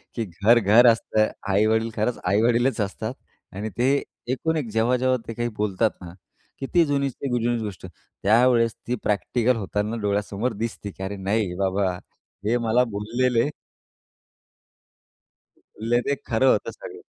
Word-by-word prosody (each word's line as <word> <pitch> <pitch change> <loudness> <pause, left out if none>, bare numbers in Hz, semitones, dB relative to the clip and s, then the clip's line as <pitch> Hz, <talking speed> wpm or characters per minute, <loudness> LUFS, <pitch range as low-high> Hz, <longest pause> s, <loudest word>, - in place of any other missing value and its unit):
की 115 - -1
घर, 105 +6 +3
घर 115 +4 +6
असतं. 110 -1 +1 0.2
आई-वडील 110 +3 +2
खरंच 110 +3 -1
आई-वडीलच 115 +4 +2
असतात 110 +4 -3 0.4
आणि 105 +2 -4
ते 130 +3 +3 0.4
एकूण 160 +4 -1
एक 130 -7 -3
जेव्हा-जेव्हा 125 +3 +2
ते 115 - -4
काही 120 +1 -2
बोलतात 105 +1 +1
ना 85 -1 -9 0.5
की 135 - -3
ती 170 -2 +5
जुनी 140 -1 0
ते 135 +2 -6
जुनीच 120 0 0
गोष्ट 100 -5 -7
त्यावेळेस 115 +2 +1
ती 125 - 0
प्रॅक्टिकल 115 +5 +1
होताना 105 +2 -2
डोळ्यासमोर 105 +3 -1
दिसते 105 -3 -5
की 95 - -9
अरे, 100 +1 -4
नाही 100 -1 -1
बाबा 95 0 0 0.5
हे 120 +3 +2
मला 115 +1 +2
बोललेले 115 +5 0 2.4
ले 120 0 +4
ते 140 - +2
खरं 130 +3 +3
होतं - - 0
सगळं. 435 -5 -11
115 Hz, 145 wpm, -24 LUFS, 105-125 Hz, 2.4 s, घर